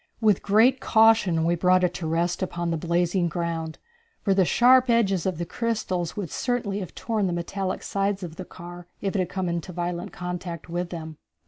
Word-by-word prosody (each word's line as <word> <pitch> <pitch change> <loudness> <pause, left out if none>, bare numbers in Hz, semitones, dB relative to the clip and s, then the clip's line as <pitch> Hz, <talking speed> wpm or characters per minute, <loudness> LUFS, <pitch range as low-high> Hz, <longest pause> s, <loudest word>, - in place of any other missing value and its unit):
With 215 -4 +3
great 225 +6 +4
caution 220 -9 +4
we 170 - +2
brought 180 +2 +3
it 180 -1 +2
to 165 - -4
rest 170 +3 0
upon 175 -2 -2
the - - 0
blazing 175 +2 +1
ground, 165 -1 -3 0.5
for 195 - +3
the 190 -1 +3
sharp 250 +5 +5
edges 195 -7 +2
of 185 -4 -1
the 170 - -3
crystals 190 -6 -2
would 195 -6 -4
certainly 225 -5 -1
have 185 - -7
torn 220 -4 -1
the 175 - -1
metallic 185 +2 -3
sides 195 0 -1
of 165 -2 -7
the 185 - -6
car 175 0 -10
if 195 -1 -2
it - - +2
had 180 -1 0
come 190 -1 -2
into 170 +1 -3
violent 175 0 -4
contact 180 -2 -6
with 175 +1 -3
them. 160 -3 -7
180 Hz, 200 wpm, -25 LUFS, 170-200 Hz, 0.5 s, sharp